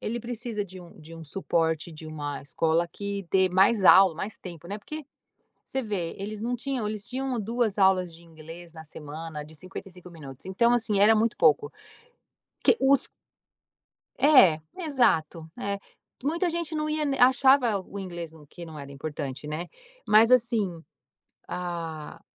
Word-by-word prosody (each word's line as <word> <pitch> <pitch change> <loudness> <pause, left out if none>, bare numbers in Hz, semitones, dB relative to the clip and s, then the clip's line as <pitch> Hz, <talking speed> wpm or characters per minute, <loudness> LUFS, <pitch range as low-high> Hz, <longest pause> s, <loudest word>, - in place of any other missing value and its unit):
Ele 235 +2 -3
precisa 235 -2 -4
de 185 -1 -11
um 175 -1 -15
de 160 +2 -12
um 165 - -10
suporte 165 -1 -1
de 155 0 -9
uma 145 -2 -5
escola 165 +4 +1
que 200 +1 -5
dê 190 -1 +4
mais 190 +3 +3
aula, 190 -3 +8
mais 200 +6 -6
tempo, 170 -3 -10
né. 200 +4 -5
Porque, 305 +8 -8 0.6
você 265 - -2
vê, 200 -8 -3
eles 210 +2 -5
não 240 +2 -1
tinham 245 -3 -3
eles 210 -1 -5
tinham 260 -1 -2
2 225 0 -1
aulas 190 -3 +3
de 165 - -14
inglês 165 +1 -12
na 160 - -10
semana, 155 0 -7
de 155 +1 -14
55 185 +1 -9
minutos. 140 -5 -10
Então, 215 +6 +2
assim, 215 -4 +1
era 215 +2 +6
muito 220 +1 +1
pouco. 150 -2 +3 0.9
Que - - +5
os 270 0 +4 1.1
É. 250 - +6 0.2
Exato. 170 - +1
É. 200 0 -2 0.5
Muita 340 +4 +1
gente 335 -1 -3
não 305 0 -1
ia 305 0 -1
n 280 -2 0
achava 255 -3 +5
o 195 +1 -9
inglês 170 -4 -6
no 155 -2 -16
que 170 +4 -10
não 160 -2 -10
era 140 -1 -9
importante, 145 -1 -6
né. 155 +4 -4 0.4
Mas, 220 +2 +6
assim, 225 -9 +2 0.7
a 165 -4 -5
190 Hz, 165 wpm, -27 LUFS, 160-235 Hz, 1.1 s, aula